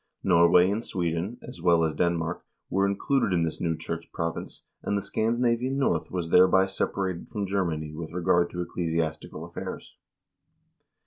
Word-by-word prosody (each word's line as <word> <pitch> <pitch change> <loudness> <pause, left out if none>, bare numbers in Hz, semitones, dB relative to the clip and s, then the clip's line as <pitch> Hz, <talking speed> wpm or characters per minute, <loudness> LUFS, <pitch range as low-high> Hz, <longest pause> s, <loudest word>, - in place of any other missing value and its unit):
Norway 90 0 +5
and 110 +3 -2
Sweden, 90 +4 -2
as 85 - -10
well 85 -1 +4
as 80 -1 +1
Denmark, 85 0 -1 0.3
were 95 +1 +2
included 100 +2 +1
in 85 -2 +2
this 80 - -3
new 80 -2 0
church 80 +1 -6
province, 85 0 -4 0.2
and 100 - -1
the - - -1
Scandinavian 120 +3 0
North 85 - +1
was 85 -3 -3
thereby 95 +1 +6
separated 95 -2 -2
from 105 -3 -3
Germany 85 -6 -2
with 80 0 -6
regard 85 0 +2
to 90 - -4
ecclesiastical 80 -2 -3
affairs. 85 - -7
90 Hz, 150 wpm, -27 LUFS, 85-100 Hz, 0.3 s, thereby